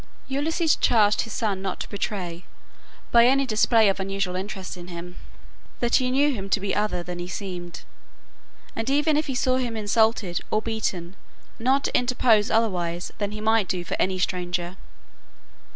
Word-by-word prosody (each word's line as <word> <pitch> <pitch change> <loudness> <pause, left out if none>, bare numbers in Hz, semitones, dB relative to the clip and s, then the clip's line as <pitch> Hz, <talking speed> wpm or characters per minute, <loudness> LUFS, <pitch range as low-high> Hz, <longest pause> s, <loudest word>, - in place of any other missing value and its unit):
Ulysses 315 +4 +1
charged 210 -3 +3
his 225 - -5
son 205 -4 -1
not 190 -1 -3
to - - -6
betray, 185 -4 -4 0.7
by 235 0 +7
any 275 +2 +3
display 225 -1 +4
of 195 0 +1
unusual 195 -1 -2
interest 190 0 -5
in 175 -1 -10
him, 180 0 -8 0.6
that 240 -1 +3
he 255 -1 0
knew 280 +3 +3
him 195 -4 -5
to 205 - +2
be 195 0 -2
other 205 -4 -1
than 175 0 -6
he 175 - -4
seemed, 175 -4 -6 0.9
and 225 +3 -2
even 295 +2 +3
if 305 +1 0
he 265 - -3
saw 255 +1 +2
him 240 -3 -2
insulted, 215 -3 +1
or 215 - +2
beaten, 195 -5 -3 0.4
not 265 +4 +2
to - - -1
interpose 245 -4 +3
otherwise 180 -6 0
than 205 -1 -1
he 210 0 -6
might 220 -2 +3
do 175 -1 -2
for - - -2
any 185 0 +1
stranger. 180 -1 -2
210 Hz, 170 wpm, -25 LUFS, 180-235 Hz, 0.9 s, by